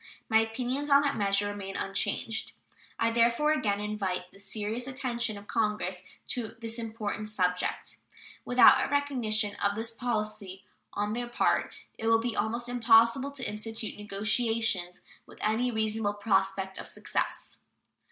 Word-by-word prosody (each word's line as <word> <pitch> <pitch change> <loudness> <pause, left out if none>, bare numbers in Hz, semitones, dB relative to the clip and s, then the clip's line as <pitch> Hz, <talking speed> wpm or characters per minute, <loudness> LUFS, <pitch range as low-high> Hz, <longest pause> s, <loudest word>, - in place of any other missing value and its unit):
My 220 -1 +6
opinions 250 +6 -2
on 280 0 +6
that 280 -1 0
measure 200 -1 +1
remain 200 -1 -6
unchanged. 220 +3 -1 0.4
I 230 0 +2
therefore 235 +6 +3
again 210 -10 +1
invite 195 -4 -3
the 195 - -17
serious 215 +4 -2
attention 245 -5 -2
of 200 - -11
Congress 205 -4 -1 0.3
to 235 -3 -3
this 230 0 -5
important 220 -2 -4
subject. 180 -3 -1 0.5
Without 245 0 +6
a - - -2
recognition 240 -7 +1
of 200 0 0
this 225 +1 -2
policy 215 -5 -3 0.3
on 210 +1 -1
their 240 +1 -3
part 240 - +1 0.3
it 225 - -2
will 225 0 +6
be 235 0 -2
almost 235 +2 -1
impossible 235 +2 +4
to 275 -3 -5
institute 220 +1 -4
negotiations 210 -2 0 0.3
with - - -15
any 225 +4 +1
reasonable 220 -2 0
prospect 195 -2 0
of - - -7
success. - - -3
220 Hz, 140 wpm, -29 LUFS, 205-240 Hz, 0.5 s, My